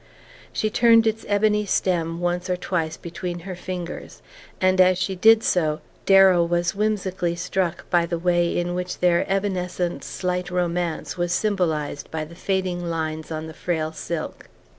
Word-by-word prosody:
She 215 - -1
turned 230 0 +5
its 220 0 -1
ebony 210 0 +2
stem 170 -3 0
once 175 +1 -1
or 180 - +1
twice 165 -3 -2
between 175 +1 -6
her 185 +1 -6
fingers, 180 -1 -7 0.4
and 185 0 +4
as 185 0 +5
she 190 +1 -1
did 225 +4 +6
so 155 -3 +1 0.3
Darrow 190 -3 +6
was 175 0 0
whimsically 190 -4 -1
struck 180 0 -2
by 170 -1 +3
the 170 0 -2
way 175 0 +1
in 175 0 -1
which 180 0 -3
their 175 -1 +2
evanescent 180 -3 -1
slight 180 -1 -3
romance 175 -1 -2
was 175 0 -1
symbolized 170 -8 -1
by 155 -1 -3
the 160 - -13
fading 185 -1 -2
lines 160 -2 -3
on 155 0 -4
the 160 - -8
frail 160 -2 -2
silk. 160 0 -6
180 Hz, 160 wpm, -23 LUFS, 170-190 Hz, 0.4 s, did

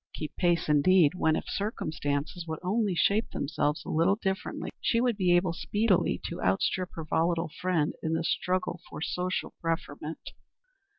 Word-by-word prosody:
Keep 155 -2 -5
pace, 175 -2 +2
indeed, 150 +2 +5
when, 160 -3 +2
if - - -2
circumstances 155 -5 -2
would 160 0 -3
only 200 0 +1
shape 205 +6 +2
themselves 145 +1 -1
a - - -6
little 170 +5 +3
differently, 190 -2 -3
she 230 - +2
would 240 -1 +2
be 180 -3 +3
able 175 -1 +2
speedily 205 +2 +1
to 175 - -5
outstrip 185 -1 +1
her 160 - -5
volatile 165 +1 +1
friend 180 -5 +1
in 160 - -1
the 165 +1 0
struggle 180 0 -1
for - - -7
social 180 +1 -2
preferment. 160 -2 -4
175 Hz, 160 wpm, -29 LUFS, 160-185 Hz, -, indeed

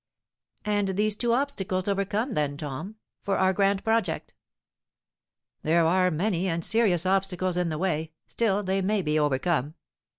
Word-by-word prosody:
"And 205 -1 +1
these 210 0 +2
two 235 +2 0
obstacles 210 -8 -1
overcome, 205 +5 -1
then, 145 -1 -1
Tom, 150 +8 -6 0.3
for 195 - -1
our 190 0 +3
grand 195 0 +1
project." 225 +1 -1 1.3
"There 165 +1 +3
are 185 +2 +3
many, 180 +2 0
and 165 -1 -1
serious 200 -6 +2
obstacles 185 -1 0
in 180 -1 0
the 155 - -3
way; 160 -3 -1
still, 205 -3 0
they 190 0 0
may 200 +1 0
be 155 0 +1
overcome." 150 +1 0
190 Hz, 145 wpm, -26 LUFS, 165-205 Hz, 1.3 s, our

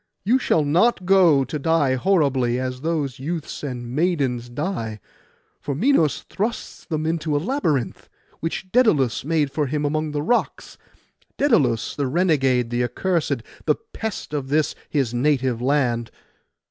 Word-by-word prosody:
You 240 +6 +3
shall 160 - +2
not 180 +7 +2
go, 175 -7 +5
to 150 +4 -4
die 145 -3 +2
horribly, 130 -6 +1
as 130 0 -4
those 150 -5 -2
youths 155 +3 -4
and 125 -4 -5
maidens 140 -8 0
die; 120 - -4 0.6
for 140 - -4
Minos 165 - +2
thrusts 220 +4 -4
them 155 -2 -2
into 160 -2 -1
a - - +3
labyrinth, 160 - -1 0.3
which 165 +3 -4
Daidalos 160 - +3
made 150 -1 0
for 145 0 -1
him 150 +2 -1
among 155 +1 -1
the 145 0 -2
rocks,—Daidalos 150 - -1
the 140 -2 -1
renegade, 135 -7 +2
the 120 +1 +1
accursed, 165 +8 -1 0.2
the - - +3
pest 220 - -6
of 140 -3 -2
this 150 +2 +1 0.2
his 135 -6 0
native 130 -2 +1
land. 125 -4 +1
150 Hz, 140 wpm, -22 LUFS, 130-170 Hz, 0.6 s, go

